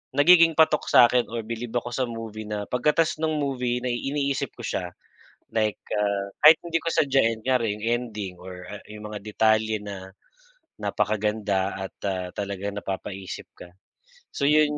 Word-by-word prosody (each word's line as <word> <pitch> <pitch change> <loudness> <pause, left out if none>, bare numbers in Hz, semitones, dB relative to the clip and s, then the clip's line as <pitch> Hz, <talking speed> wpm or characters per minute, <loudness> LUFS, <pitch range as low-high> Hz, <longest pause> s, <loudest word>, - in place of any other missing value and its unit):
nagiging 165 +2 +6
patok 155 -2 +4
sa'kin 120 0 +6
or 115 -1 -4
bilib 115 +1 -5
ako 120 - -3
sa 130 +1 0
movie 110 -2 -7
na 105 -1 -3
pagkata's 150 +6 +2
ng 155 -1 +1
movie 125 -4 -1
na - - 0
iniisip 140 +3 -1
ko - - -9
siya. 90 - -2 0.6
Like, 110 -2 0 0.2
ah, 100 -1 0 0.2
kahit 155 +2 +10
hindi 165 -1 0
ko - - -5
sadyain, 130 -7 +2
kunyari 125 -5 +2
yung 105 - -6 0.2
ending 100 -4 -6
or, 90 0 -9
ah, 105 0 -8
yung 105 0 -8
mga 105 - -5
detalye 110 +1 +2
na 95 -2 -8 0.7
napakaganda 105 -2 0
at, - - -38
ah, 90 -1 -2
talagang, 100 0 -4
napapaisip 95 -1 -5
ka. 90 - -11 0.6
So, 140 - -2
'yun 150 0 +4
110 Hz, 160 wpm, -25 LUFS, 100-135 Hz, 0.7 s, kahit